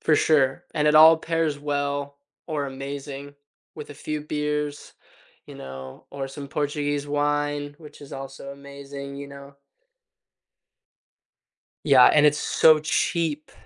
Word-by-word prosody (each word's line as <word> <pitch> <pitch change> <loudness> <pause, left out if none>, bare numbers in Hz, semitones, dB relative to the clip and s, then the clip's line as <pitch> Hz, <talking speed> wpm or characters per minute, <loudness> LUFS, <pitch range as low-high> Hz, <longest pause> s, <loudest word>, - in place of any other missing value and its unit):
For 155 - +3
sure, 135 -4 +2
and 150 0 +2
it 150 - +4
all 160 +1 +9
pairs 165 -2 -1
well 145 -1 -3 0.3
or 145 -3 -2
amazing 140 +1 -7 0.4
with 150 -1 -8
a - - -9
few 150 +1 -4
beers, 150 -1 -3 0.5
you - - -11
know, 65 0 -10
or 135 -1 -5
some 140 +1 -9
Portuguese 145 0 -2
wine, 145 0 -1
which 150 -2 -14
is 145 - -12
also 135 0 -8
amazing, 140 0 -9
you 140 0 -8
know? 140 0 -12 2.3
Yeah, 135 -4 +7
and 150 0 +5
it's 150 0 +4
so 155 -1 +5
cheap. 155 0 -1
145 Hz, 130 wpm, -24 LUFS, 140-150 Hz, 2.3 s, all